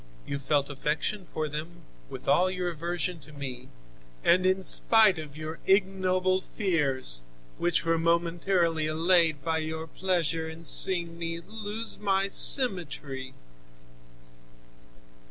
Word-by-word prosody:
You 140 - -4
felt 140 0 +1
affection 150 +7 -2
for 155 -1 -2
them, 155 +4 -7 0.3
with - - -9
all 185 +1 +4
your 180 -1 -2
aversion 175 +1 -3
to 155 - -15
me, 130 -3 -7 0.5
and 185 +2 +4
in 190 0 +1
spite 215 -3 +4
of 150 -2 -9
your 155 +1 -6
ignoble 185 -1 +2
fears, 140 - -1 0.4
which 175 -1 +1
were 165 0 +2
momentarily 170 -1 +1
allayed 160 -2 +2
by 160 -1 +1
your 160 0 -4
pleasure 165 -2 -1
in 160 +1 -11
seeing 170 0 +2
me 165 0 -3
lose 215 +4 -5
my 195 -1 +1
symmetry. 150 - +2
170 Hz, 120 wpm, -28 LUFS, 155-185 Hz, 0.5 s, all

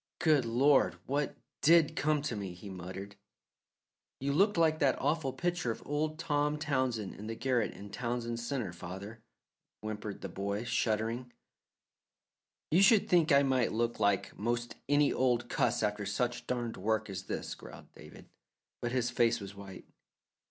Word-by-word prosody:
"Good 150 -6 +3
Lord! 130 +5 +4
What 145 +2 -1 0.3
DID 165 -1 +5
come 150 -1 +1
to 135 -6 -2
me?" 95 -4 -5
he 95 +3 -9
muttered. 95 +2 -7 1.0
"You 140 +1 -1
looked 200 +5 +3
like 160 -1 +3
that 135 -2 +2
awful 145 -1 0
picture 175 -4 -1
of 115 - -4
old 155 +2 -1
Tom 150 -2 0
Townsend 130 -9 -1
in 105 - -8
the 115 - -4
garret 120 -2 0
in 100 0 -10
Townsend 120 0 -3
Centre, 120 -6 -3
father," 95 +6 -8 0.6
whimpered 105 -1 -5
the - - -4
boy, 100 +4 -3
shuddering. 115 +1 -1 1.4
"Should 195 +4 +6
think 170 -3 +4
I 140 0 +6
might 130 -3 +2
look 115 +1 0
like 100 -2 +1
'most 120 +2 -2 0.2
any 145 0 +4
old 120 -2 +1
cuss - - +1
after 105 -1 -1
such 120 +4 -2
darned 120 -2 -2
work 110 +2 0
as 95 -1 -6
this," - - -4
growled - - -12
David, - - -13 0.5
but 120 - -2
his 120 -1 0
face 120 -1 +2
was 100 -1 -8
white. 100 -2 -10
120 Hz, 155 wpm, -32 LUFS, 105-145 Hz, 1.4 s, Should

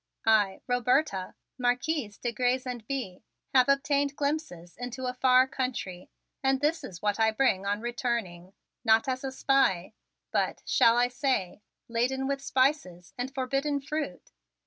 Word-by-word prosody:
I, 210 -3 +3
Roberta, 245 -5 +1 0.2
Marquise 250 -1 0
de 240 - -2
Grez 250 +3 0
and 245 -3 -5
Bye, 250 -10 -4 0.3
have 255 0 +5
obtained 280 0 +2
glimpses 280 - -3
into 245 +1 -6
a 250 - -1
far 255 0 +4
country 250 -9 -4 0.3
and 270 -1 +2
this 300 +4 0
is 175 -1 -9
what 205 +1 0
I 220 0 +4
bring 215 -4 +1
on 205 +1 -1
returning, 230 -7 -3 0.3
not 225 +4 +4
as 260 0 -2
a 270 - -3
spy, 260 -9 +1 0.4
but, - - -1
shall 230 0 +4
I 245 0 +4
say, 245 -7 -1 0.3
laden 250 +3 0
with 275 0 -1
spices 255 - 0
and 250 +2 -4
forbidden 275 +2 -1
fruit? 285 - -5
250 Hz, 145 wpm, -28 LUFS, 215-270 Hz, 0.4 s, have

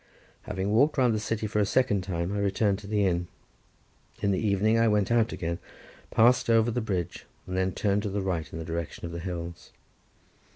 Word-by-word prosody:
Having 100 -1 -2
walked 140 +8 +3
round 125 -3 +4
the 110 - 0
city 110 0 -2
for 105 0 -1
the 105 - +3
second 105 -4 +2
time, 90 0 -2
I 105 - -1
returned 100 0 +1
to 105 - -11
the 105 -1 +1
inn. 90 -1 0 0.9
In 100 -1 +1
the 95 - +1
evening 110 +1 +2
I 115 - +4
went 105 -1 +2
out 115 -1 +3
again, 85 0 -3 0.5
passed 125 +2 +4
over 115 +1 +4
the 125 - -1
bridge, 95 -6 -3 0.2
and 90 - -5
then 95 0 +1
turned 100 +2 0
to 105 - -3
the 100 0 -2
right 85 -5 -2
in - - -6
the 80 - -5
direction 85 0 -4
of 85 - -5
the 85 - -5
hills. 85 -1 -6
100 Hz, 210 wpm, -27 LUFS, 90-110 Hz, 0.9 s, round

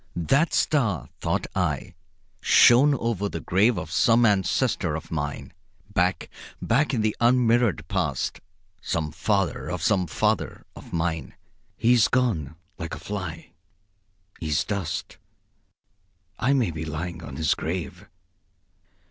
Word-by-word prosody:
"That 135 - +2
star," 115 - +1
thought - - -1
I, - - -1 0.5
"shone 140 +5 +6
over 115 -5 -1
the 85 - -5
grave 105 +9 +2
of - - -5
some 120 +1 +4
ancestor 100 - +1
of 80 +1 -7
mine; 75 -3 -4 0.4
back, - - +1 0.3
back 135 +6 +1
in 115 - 0
the 110 -1 0
unmirrored 120 -6 +3
past, 85 -9 -2 0.4
some 80 -3 -2
father 90 0 -1
of 90 -3 -4
some 95 -3 +2
father - - -1
of - - -12
mine. 80 -4 -2 0.4
He 120 +2 +4
is 120 -3 +5
gone, 100 - 0 0.2
like 80 -1 -4
a - - -10
fly. 90 -5 -6 0.9
He 80 - -5
is 75 -2 +1
dust. 85 -6 -4 1.2
I 130 +4 +2
may 125 -10 +1
be 80 0 -5
lying 80 +2 -5
on 70 - -8
his 80 0 +2
grave. 85 +1 -5
95 Hz, 130 wpm, -25 LUFS, 80-115 Hz, 1.2 s, shone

